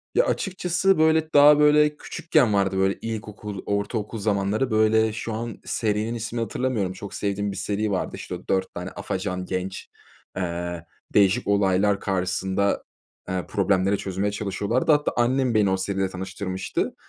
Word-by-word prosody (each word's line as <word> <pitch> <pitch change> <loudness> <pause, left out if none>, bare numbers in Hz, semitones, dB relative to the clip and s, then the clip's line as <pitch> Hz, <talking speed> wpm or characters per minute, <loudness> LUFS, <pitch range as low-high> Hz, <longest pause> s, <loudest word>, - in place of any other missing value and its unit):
Ya, 485 - +4
açıkçası 185 0 +1
böyle 160 0 +3
daha 145 +1 +8
böyle 150 0 +4
küçükken 150 -11 +1
vardı. 95 -1 +1
Böyle 95 +1 +1
ilkokul, 105 -3 -6
ortaokul 105 +2 -2
zamanları. 105 +4 0
Böyle 110 0 +3
şu 115 0 -4
an 115 +1 -4
serinin 110 +1 -1
ismini 115 +1 -3
hatırlamıyorum. 115 -4 -1
Çok 100 +1 -9
sevdiğim 100 0 -2
bir 100 - -7
seri 105 +1 -1
vardı. 95 - -2
İşte - - -6
o - - -12
4 95 -1 0
tane - - -5
afacan 90 0 -4
genç, 95 +1 -4 0.5
eee, 85 -1 -3 0.3
değişik 100 +3 +3
olaylar 100 0 +2
karşısında, 95 +1 0 0.5
eee, 95 -1 -2
problemleri 100 -1 +1
çözmeye 100 +2 -2
çalışıyorlardı. 105 +7 0
Hatta 145 0 +3
annem 125 +1 +2
beni 105 -2 +3
o 95 - +1
seriyle 95 0 -1
tanıştırmıştı. 95 0 -4
105 Hz, 150 wpm, -24 LUFS, 95-115 Hz, 0.5 s, daha